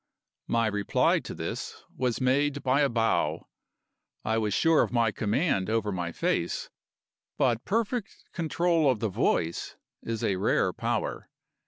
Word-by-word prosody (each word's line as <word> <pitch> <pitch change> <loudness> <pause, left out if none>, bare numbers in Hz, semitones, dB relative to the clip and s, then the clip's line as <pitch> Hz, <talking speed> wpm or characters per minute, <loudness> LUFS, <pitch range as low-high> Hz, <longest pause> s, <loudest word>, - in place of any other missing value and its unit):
My 115 0 +2
reply 105 -2 +2
to - - -8
this - - -5
was 125 -3 -1
made 140 +3 +1
by 130 +2 +3
a 140 - +3
bow. 115 -1 0 0.8
I 110 +1 +1
was 105 -2 -1
sure 160 +9 +4
of - - 0
my 115 -3 +2
command 105 - 0
over 110 -2 0
my 90 -3 -3
face; - - -1 0.7
but 120 -4 +1
perfect 225 +1 -2
control 165 -2 +2
of 125 -5 +1
the 110 0 0
voice 85 -2 0 0.3
is 115 -1 -4
a 95 - +1
rare 95 - +1
power. - - -2
115 Hz, 145 wpm, -28 LUFS, 105-145 Hz, 0.8 s, sure